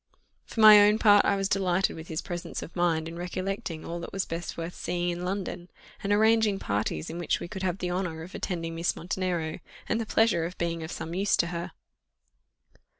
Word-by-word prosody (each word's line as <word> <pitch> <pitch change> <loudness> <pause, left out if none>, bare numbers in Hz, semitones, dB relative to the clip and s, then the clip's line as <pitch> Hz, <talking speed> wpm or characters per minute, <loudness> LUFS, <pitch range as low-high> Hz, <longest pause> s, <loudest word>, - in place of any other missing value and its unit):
For 225 - -3
my 215 -1 +10
own 210 +1 +5
part, 205 -2 +6
I 200 - +3
was 195 0 0
delighted 190 -1 +1
with 160 0 -9
his 160 -1 -4
presence 175 -2 -5
of - - -11
mind 165 -2 +1
in 165 +1 -7
recollecting 185 -1 -4
all 170 +1 -4
that 170 - -7
was 195 -1 -2
best 165 +1 -5
worth 165 +1 -4
seeing 175 0 -2
in 175 0 -3
London, 180 -1 -4 0.3
and 200 - -2
arranging 220 -1 +4
parties 100 - -2
in 170 - -6
which 170 - 0
we - - -6
could 190 +1 -7
have 185 -1 -1
the 180 -2 -3
honour 175 -3 -3
of 180 - -11
attending 165 -2 -3
Miss 165 +1 0
Montenero, 175 -2 -2 0.3
and 225 - 0
the 225 - -5
pleasure 220 -7 +3
of 180 +2 -6
being 170 -1 -2
of 160 +1 -6
some 165 +1 -5
use 195 +3 +2
to 170 - +2
her. 170 0 -4
175 Hz, 210 wpm, -28 LUFS, 165-195 Hz, 0.3 s, my